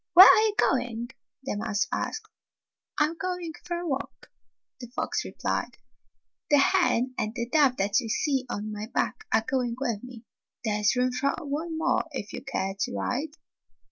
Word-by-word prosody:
"Where 370 +2 +13
are - - +8
you 435 -2 +1
going?" 240 - +1 0.3
the 265 - -3
mouse 215 +2 0
asked. 435 0 -3 0.7
"I - - +6
'm 325 +2 -5
going 360 -3 -3
for 345 -1 -3
a 345 0 -4
walk," 275 -1 -5 0.5
the 245 - -8
fox 240 - -2
replied. - - -3 0.7
"The 290 - +6
hen 275 -6 +3
and 215 +2 -2
the 235 -1 -2
dove 275 -1 +3
that 200 +5 +2
you 230 -4 -5
see 270 +1 0
on 215 -1 -4
my 210 0 -5
back 435 - -1
are 220 0 +3
going 250 -4 0
with 235 -6 -2
me. 245 -2 -10 0.4
There 210 -1 0
's 210 - +4
room 250 0 +2
for 275 +3 0
one 315 +3 -3
more 320 - +1
if 210 -6 -5
you - - -6
care 195 -8 -2
to 245 - -1
ride." 295 +5 -2
255 Hz, 180 wpm, -27 LUFS, 225-310 Hz, 0.7 s, Where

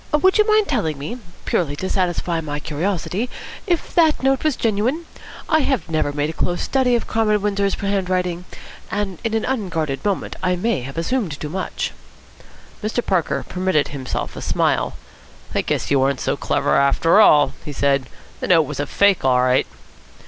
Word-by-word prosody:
Would 375 +6 +4
you 425 - +5
mind 430 -1 +4
telling 180 - -1
me, 220 - -6 0.3
purely 145 -5 0
to 185 - -3
satisfy 175 -3 0
my 145 -1 -4
curiosity, 180 +8 -2 0.4
if 345 -3 -1
that 320 -5 +3
note 270 0 +2
was 310 -4 +2
genuine? 235 +9 0 0.4
I 315 - +3
have 265 - -1
never 155 -2 +1
made 145 +1 -1
a - - -10
close 175 +2 -1
study 260 -2 +2
of 235 - -1
Comrade 215 -2 +1
Windsor's 200 -1 +1
handwriting, 185 -3 -1 0.4
and 195 -4 -3
in 225 -1 -1
an 225 - 0
unguarded 165 - -2
moment 205 -2 -2
I 180 -1 +1
may 190 - 0
have 135 +5 -8
assumed 170 - -1
too 150 - -4
much." 185 +3 -3 0.9
Mr. 220 +2 -1
Parker 180 -4 0
permitted 185 -5 0
himself 135 -3 -4
a - - -6
smile. - - 0 0.6
"I - - +2
guess - - -2
you 140 -2 +4
aren't 135 +1 +1
so - - 0
clever - - 0
after 140 +7 +4
all," 145 -8 +6
he 150 - -6
said. 140 -2 +1 0.3
"The - - -3
note 165 -3 +5
was 150 -2 -6
a 145 - -1
fake 200 +4 +3
all 125 -1 +4
right." 130 0 +3
185 Hz, 180 wpm, -21 LUFS, 150-225 Hz, 0.9 s, all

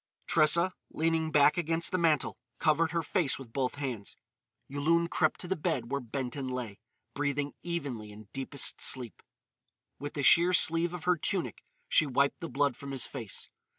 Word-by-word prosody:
Tressa, 170 +4 +4 0.2
leaning 160 0 0
back 150 0 +4
against 165 +1 0
the 185 - 0
mantel, 160 -4 +1 0.2
covered 160 +1 +2
her 165 +1 -1
face 155 -2 0
with 125 -4 -12
both 130 -1 -1
hands. 125 -8 -5 0.5
Yulun 165 +5 +1
crept - - +1
to 180 - -5
the 190 - 0
bed 125 -7 -2
where 140 0 -1
Benton 130 +2 -4
lay, 125 -5 -5 0.3
breathing 145 +1 -2
evenly 140 -11 -4
in 105 0 -13
deepest 135 +1 -1
sleep. 125 -4 -1 0.8
With 145 +1 -6
the 145 - -2
sheer 175 +6 +7
sleeve 165 0 +4
of 170 - -8
her 180 -1 +2
tunic 180 +3 -2 0.3
she 155 - +3
wiped 140 +1 +1
the 165 - -6
blood 140 0 +1
from 140 - -9
his 135 -3 -1
face. 110 -5 -6
145 Hz, 170 wpm, -30 LUFS, 130-165 Hz, 0.8 s, sheer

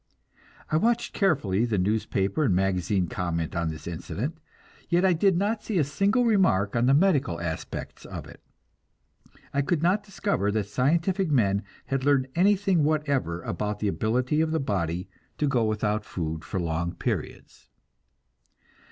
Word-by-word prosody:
I 155 - +3
watched 235 +6 +1
carefully 135 - +1
the 115 -4 0
newspaper 100 +4 0
and 100 -8 +2
magazine 95 0 +1
comment 85 -2 -3
on 85 -1 0
this 80 -1 -7
incident, 115 - -4 0.5
yet 175 +2 +3
I 185 - +5
did 180 +2 +3
not 210 +4 0
see 215 - -2
a 160 - +4
single 200 - +1
remark 180 - +3
on 120 +1 +2
the 135 - +5
medical 145 - +2
aspects 80 -2 -5
of - - -7
it; - - -14 1.1
I 140 - +2
could 155 +2 0
not 185 +5 +3
discover 200 - -1
that 110 -2 0
scientific 165 - +1
men 100 -8 +2 0.2
had 135 -1 -2
learned 135 -2 +2
anything 195 -2 +3
whatever 140 - 0
about 105 +4 -3
the 105 -1 -1
ability 125 - 0
of 160 - +1
the 160 0 0
body 90 -7 -2 0.3
to 150 - +1
go 125 -4 +2
without 105 0 0
food 80 -5 -4
for 95 - -3
long 85 0 -2
periods. - - -5
125 Hz, 155 wpm, -26 LUFS, -, 1.1 s, I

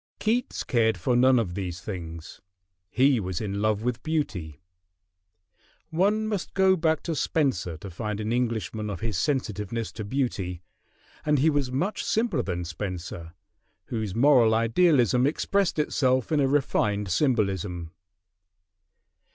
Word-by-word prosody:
Keats 230 +3 -1
cared 115 -2 +2
for 125 -3 0
none 130 +1 +5
of 105 -7 0
these 90 -3 -4
things: 85 -5 -7 0.5
he 130 +4 +3
was 95 -3 -3
in 100 -1 -3
love 110 0 +1
with 125 0 -2
beauty. 100 - -3 1.3
One 205 +6 +2
must 205 -4 -3
go 190 -1 +5
back 160 -2 +1
to 170 - -2
Spenser 130 - 0
to 95 +4 -9
find 105 +4 -4
an 110 +1 -2
Englishman 110 -3 -1
of 100 -4 -5
his 110 -3 -2
sensitiveness 115 - -2
to 110 - -6
beauty, 100 -7 -2 0.6
and 150 -1 +2
he 155 +4 +3
was 140 -3 0
much 180 +11 -1
simpler 220 - +1
than 90 -5 -3
Spenser, 85 -1 -6 0.5
whose 110 -5 -3
moral 120 -3 +5
idealism 125 - +3
expressed 195 +5 0
itself 130 -4 +1
in 155 - +3
a 135 - +3
refined 105 -8 +1
symbolism. 95 - 0
115 Hz, 135 wpm, -26 LUFS, 95-145 Hz, 1.3 s, none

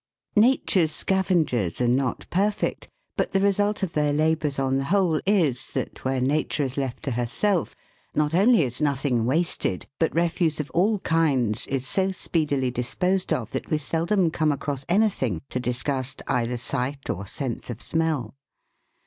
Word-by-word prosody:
NATURE'S 210 - +4
scavengers 160 - 0
are 125 - +2
not 125 0 0
perfect, 205 +3 0 0.3
but - - -1
the 195 - +3
result 205 +1 +1
of 180 - -2
their 150 -1 +2
labours 155 -1 +1
on 135 0 +1
the 135 - -1
whole 175 -2 +2
is, 160 -11 +2
that, - - -4
where 130 0 0
Nature 145 +3 +1
is 135 -1 -3
left 135 -3 -3
to 140 - -2
herself, 135 - 0 0.4
not 150 +1 +1
only 200 +1 +5
is 125 +2 -4
nothing 135 -5 +1
wasted, 150 - 0
but 165 - +1
refuse 165 -2 +1
of 150 - -4
all 205 +5 +2
kinds 135 -10 +1
is 135 -1 -2
so 190 +7 +1
speedily 145 -8 0
disposed 180 +10 -1
of - - -1
that - - -4
we 155 - +2
seldom 165 +4 +1
come 155 -1 +1
across 140 -1 -3
anything 175 - +2
to 125 - -1
disgust 130 +2 -2
either 125 0 0
sight 135 +3 -3
or 100 +3 -3
sense 125 +1 -5
of 120 -2 -5
smell. 155 -8 -1
150 Hz, 160 wpm, -25 LUFS, 130-175 Hz, 0.4 s, only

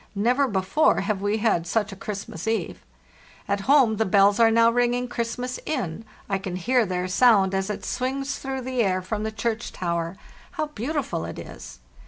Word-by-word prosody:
Never 250 +7 +2
before 205 +9 +2
have 210 -3 -2
we 205 +2 0
had 210 -6 +1
such 210 +2 0
a - - -7
Christmas 200 -3 -6
eve. 220 -6 -2 0.7
"At 200 0 0
home 260 -7 +5
the 220 - +2
bells 200 +2 +4
are 230 -1 +6
now 230 +1 +5
ringing 245 +1 +1
Christmas 245 +1 -3
in, 225 - -3 0.2
I 195 -1 -1
can 190 -2 -5
hear 235 +5 +2
their 180 0 -2
sound 195 -1 +4
as 195 +1 -1
it 210 - -4
swings 270 +2 -2
through 265 -1 -4
the 255 -1 -1
air 185 -3 +1
from 210 +3 -3
the 220 0 -2
church 225 +1 -3
tower. 170 0 -3 0.4
How 310 -3 -1
beautiful 275 - -3
it - - -6
is! - - -10
220 Hz, 185 wpm, -24 LUFS, 190-245 Hz, 0.7 s, are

